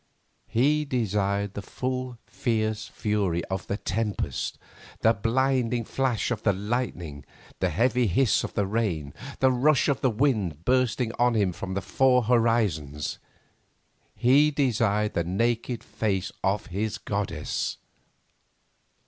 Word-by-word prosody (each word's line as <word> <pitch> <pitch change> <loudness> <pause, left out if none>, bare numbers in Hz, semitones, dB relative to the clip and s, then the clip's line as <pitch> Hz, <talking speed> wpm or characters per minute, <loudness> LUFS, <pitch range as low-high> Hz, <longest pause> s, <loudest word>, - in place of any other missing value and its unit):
He 145 +7 +2
desired 100 -6 -1
the 100 - -5
full 130 +3 -4
fierce 110 -4 -1
fury 100 -5 -1
of 95 0 -3
the 100 - -1
tempest, 105 0 -2 0.4
the 115 - +5
blinding 120 +1 +1
flash 130 -2 0
of 120 - -2
the 100 - +2
lightning, 95 - -3 0.4
the - - +1
heavy 120 +6 +2
hiss 110 +6 +2
of - - -6
the 100 - +1
rain, 95 -9 -1 0.3
the 130 0 +5
rush 135 +4 +3
of 140 -3 +1
the 130 - +3
winds 110 - +1
bursting 125 -2 +2
on 120 -1 +3
him 100 -4 +2
from 95 +2 -5
the 100 - -1
four 130 -2 +3
horizons; 105 - +1 1.0
he 140 +5 +5
desired 110 -7 +1
the 85 - 0
naked 115 +6 -1
face 105 -4 -2
of 100 +2 +1
his 105 +3 -3
goddess. 95 -7 -3
110 Hz, 130 wpm, -26 LUFS, 100-125 Hz, 1.0 s, the